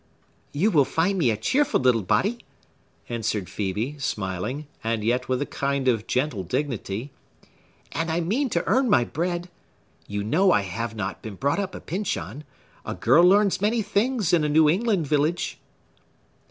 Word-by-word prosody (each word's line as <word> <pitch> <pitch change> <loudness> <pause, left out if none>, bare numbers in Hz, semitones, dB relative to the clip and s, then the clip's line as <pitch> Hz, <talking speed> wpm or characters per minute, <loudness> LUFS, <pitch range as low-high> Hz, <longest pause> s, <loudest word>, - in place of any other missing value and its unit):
"You 185 +10 +1
will 150 -6 +5
find 180 +8 0
me 135 -8 +3
a 110 - 0
cheerful 265 - +1
little 125 -3 +3
body" 205 - +1 0.7
answered 110 -4 -2
Phœbe, 110 +11 -3
smiling, 105 +7 -3 0.2
and 115 -1 -1
yet 125 +3 0
with 130 +2 +1
a - - -5
kind 140 -1 -2
of 115 -4 +1
gentle 130 -6 0
dignity, 120 - -3 0.8
"and 165 +3 -2
I 160 +1 0
mean 225 - 0
to 170 - -1
earn 255 +5 +2
my 120 - +5
bread. 175 +6 -3 0.6
You 100 0 -3
know 180 - +3
I 105 - +4
have 110 +4 -4
not 100 -2 -4
been 110 -3 -7
brought 140 - 0
up 195 -2 -3
a - - -6
Pyncheon. 170 -5 -4 0.4
A - - -5
girl 135 +9 +4
learns 200 +1 +4
many 220 +2 +1
things 215 -2 0
in 165 -3 +4
a 150 - +1
New 155 +1 +5
England 195 +1 +2
village." 155 +5 0
145 Hz, 165 wpm, -25 LUFS, 115-185 Hz, 0.8 s, will